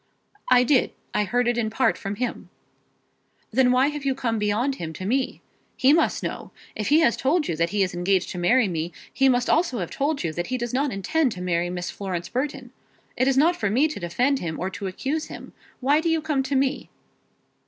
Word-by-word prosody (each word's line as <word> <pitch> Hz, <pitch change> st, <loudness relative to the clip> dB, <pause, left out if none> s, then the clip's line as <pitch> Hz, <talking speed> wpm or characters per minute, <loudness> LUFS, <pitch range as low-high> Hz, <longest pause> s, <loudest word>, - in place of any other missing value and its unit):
"I 250 Hz, -1 st, +6 dB
did. 255 Hz, +1 st, +2 dB, 0.2 s
I 210 Hz, -, +1 dB
heard 245 Hz, +4 st, +1 dB
it 240 Hz, 0 st, +1 dB
in 220 Hz, -2 st, 0 dB
part 255 Hz, +4 st, +2 dB
from 200 Hz, 0 st, -5 dB
him." 250 Hz, +3 st, -4 dB, 1.0 s
"Then 250 Hz, +2 st, +4 dB
why 260 Hz, +3 st, +4 dB
have 295 Hz, -1 st, -6 dB
you 270 Hz, -1 st, 0 dB
come 230 Hz, -4 st, -1 dB
beyond 215 Hz, +6 st, 0 dB
him 160 Hz, -2 st, -5 dB
to 185 Hz, -, -7 dB
me? 260 Hz, +6 st, -1 dB, 0.4 s
He 265 Hz, +2 st, +5 dB
must 325 Hz, -, +2 dB
know. -, -, -5 dB, 0.3 s
If 210 Hz, -, -3 dB
he 300 Hz, +5 st, +5 dB
has 275 Hz, -8 st, +4 dB
told 300 Hz, +4 st, +1 dB
you 165 Hz, -, -1 dB
that 170 Hz, +1 st, +1 dB
he 200 Hz, +1 st, +1 dB
is 185 Hz, -, -2 dB
engaged 180 Hz, +2 st, 0 dB
to 180 Hz, -, -5 dB
marry 230 Hz, +6 st, +3 dB
me, 170 Hz, -1 st, -3 dB, 0.2 s
he 270 Hz, 0 st, +4 dB
must 245 Hz, -1 st, +2 dB
also 325 Hz, -6 st, +2 dB
have 180 Hz, -5 st, -4 dB
told 290 Hz, -3 st, -1 dB
you 165 Hz, -2 st, -2 dB
that 175 Hz, +2 st, -3 dB
he 255 Hz, -, -1 dB
does 240 Hz, -1 st, -4 dB
not 275 Hz, +2 st, +1 dB
intend 255 Hz, +6 st, 0 dB
to 180 Hz, -, -8 dB
marry 175 Hz, -1 st, 0 dB
Miss 180 Hz, 0 st, -4 dB
Florence 180 Hz, -3 st, -5 dB
Burton. 260 Hz, -1 st, -3 dB, 0.4 s
It 255 Hz, -, +1 dB
is 270 Hz, -1 st, +2 dB
not 330 Hz, +5 st, +4 dB
for 205 Hz, -11 st, -1 dB
me 260 Hz, +9 st, +3 dB
to 305 Hz, -, -6 dB
defend 250 Hz, +11 st, 0 dB
him 160 Hz, -2 st, -4 dB
or 185 Hz, +2 st, -2 dB
to 195 Hz, -, -5 dB
accuse 275 Hz, +11 st, -3 dB
him. -, -, -10 dB, 0.3 s
Why 285 Hz, +4 st, +3 dB
do 335 Hz, -, 0 dB
you 325 Hz, 0 st, +2 dB
come 305 Hz, -3 st, 0 dB
to 270 Hz, +1 st, -2 dB
me?" 270 Hz, +1 st, 0 dB
245 Hz, 225 wpm, -24 LUFS, 190-275 Hz, 1.0 s, I